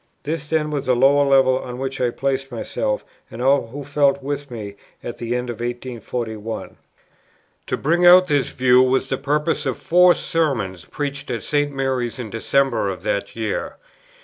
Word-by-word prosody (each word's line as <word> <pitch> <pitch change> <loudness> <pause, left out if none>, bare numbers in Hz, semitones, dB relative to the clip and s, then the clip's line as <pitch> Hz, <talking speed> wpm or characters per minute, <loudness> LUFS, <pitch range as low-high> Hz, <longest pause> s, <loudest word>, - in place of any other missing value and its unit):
This 150 0 -4
then 155 -1 0
was 145 -2 -3
that 125 - +3
lower 140 +3 +5
level 135 -2 +4
on 125 -1 -7
which 135 0 -4
I 125 - +2
placed 135 +2 -2
myself, - - -2 0.2
and 115 - -10
all 135 -1 +3
who 140 +5 -7
felt 140 -1 +1
with 145 0 -4
me, 105 -4 -7 0.3
at 120 - -6
the 120 +1 -2
end 125 0 -2
of 115 - -8
1841. 120 -2 -4
Matt. - - -10
xxiv. - - -25
15. - - -26 0.9
To - - -1
bring 170 +4 +3
out 180 +1 +8
this 145 -5 +1
view 125 0 +4
was 130 +1 +1
the - - -1
purpose 150 +2 0
of 130 - -1
Four 180 +1 +5
Sermons 125 - -1
preached 140 -1 -5
at 115 -5 -3
St. 145 -1 0
Mary's 130 -3 -2
in 120 -5 -6
December 120 -1 +1
of 95 -2 -6
that 100 - -2
year. 110 -2 -3
135 Hz, 190 wpm, -21 LUFS, 120-145 Hz, 0.9 s, out